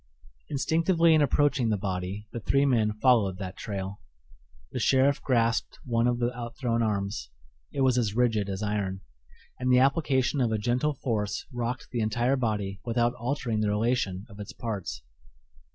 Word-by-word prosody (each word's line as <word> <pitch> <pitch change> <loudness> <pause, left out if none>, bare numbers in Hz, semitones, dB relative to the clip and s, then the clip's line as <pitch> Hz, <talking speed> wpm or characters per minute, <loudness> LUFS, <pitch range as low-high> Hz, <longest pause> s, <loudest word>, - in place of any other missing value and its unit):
Instinctively 165 +3 +3
in 155 - +5
approaching 140 -3 +2
the 105 - +1
body 95 +2 -4
the 120 - -4
three 140 +5 +2
men 115 -6 +2
followed 105 -5 +3
that 95 -1 -6
trail. 100 -1 -5 0.7
The 125 - -3
sheriff 135 +3 +3
grasped 115 -3 +1
one 115 -1 +2
of 120 0 +1
the 120 0 -1
outthrown 120 0 -2
arms; 100 - -2 0.4
it - - -2
was 130 -2 +4
as 105 -3 -1
rigid 110 -5 +1
as 95 +2 -3
iron, 100 -2 -2 0.6
and 125 0 +1
the 125 - +6
application 135 0 +2
of 120 -3 +1
a 110 - +1
gentle 125 +7 0
force 110 -5 -2
rocked 120 0 -3
the 120 - -2
entire 120 +4 +1
body 105 -6 -2
without 120 0 +1
altering 120 -2 -2
the 105 -1 +1
relation 105 -3 0
of 105 -3 -14
its 105 - -7
parts. 100 - -5
115 Hz, 165 wpm, -27 LUFS, 105-130 Hz, 0.7 s, the